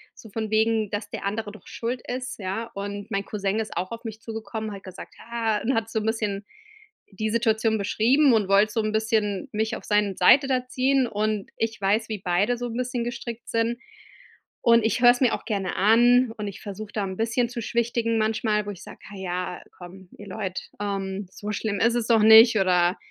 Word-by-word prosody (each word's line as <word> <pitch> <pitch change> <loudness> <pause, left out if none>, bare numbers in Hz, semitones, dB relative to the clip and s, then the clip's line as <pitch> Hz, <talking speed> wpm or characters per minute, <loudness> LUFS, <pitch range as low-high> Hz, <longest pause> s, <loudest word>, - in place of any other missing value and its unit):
so 220 - -13
von 220 -1 -3
wegen, 220 -1 +2
„dass 205 0 -4
der - - -6
andere 210 +1 -3
doch 215 - -15
schuld 240 +1 -4
ist“, 255 0 -5
ja, 210 +4 -4
und 200 0 -6
mein 195 0 -1
Cousin 200 0 -2
ist 220 -5 -4
auch 185 +2 -3
auf 230 +1 -7
mich 220 -2 -7
zugekommen, 220 -1 -5
hat 195 - -10
gesagt 185 -2 -10
„Ja“, 225 -2 -2
und 260 +4 +1
hat 225 0 0
so'n 220 -1 -2
bisschen 210 -3 -1 0.7
die 215 +3 -3
Situation 220 -1 +1
beschrieben 245 +7 +3
und 215 -4 +2
wollte 205 +2 +4
so 225 - +1
'n 215 - -1
bisschen 220 +1 0
mich 220 +1 -1
auf - - -9
seine 210 -2 +1
Seite 275 -1 +6
da 255 -2 0
ziehen, 265 +1 +2
und 215 -2 -2
ich 225 -1 -2
weiß, 215 +3 +1
wie 215 - -2
beide 190 +6 +1
so 245 - -4
'n 230 - -5
bisschen 250 -1 -2
gestrickt 240 -1 -6
sind, 230 +1 0 0.8
und 230 -1 +5
ich 225 +2 0
höre 245 -1 +8
es 245 - -3
mir 250 - +4
auch - - -10
gerne 200 -5 -2
an, 240 +4 +5
und 210 - -4
ich 200 - -8
versuche 205 +1 -7
da 210 - -1
'n 190 -1 -4
bisschen 230 +2 +1
zu 240 -1 -5
schwichtigen 230 0 0
manchmal, 215 -1 0
wo 205 - -4
ich 190 - -11
sage: - - -12
„Ha - - -9
ja, 180 -1 -4 0.2
komm, 180 +1 -12
ihr 205 - -11
Leute, 190 -1 -4 0.2
ähm, 195 -1 -3
so 210 0 -6
schlimm 205 -1 -2
isses 235 0 +2
doch 225 -2 +4
nicht 220 +1 +8
oder 180 -1 +3
220 Hz, 210 wpm, -25 LUFS, 200-230 Hz, 0.8 s, höre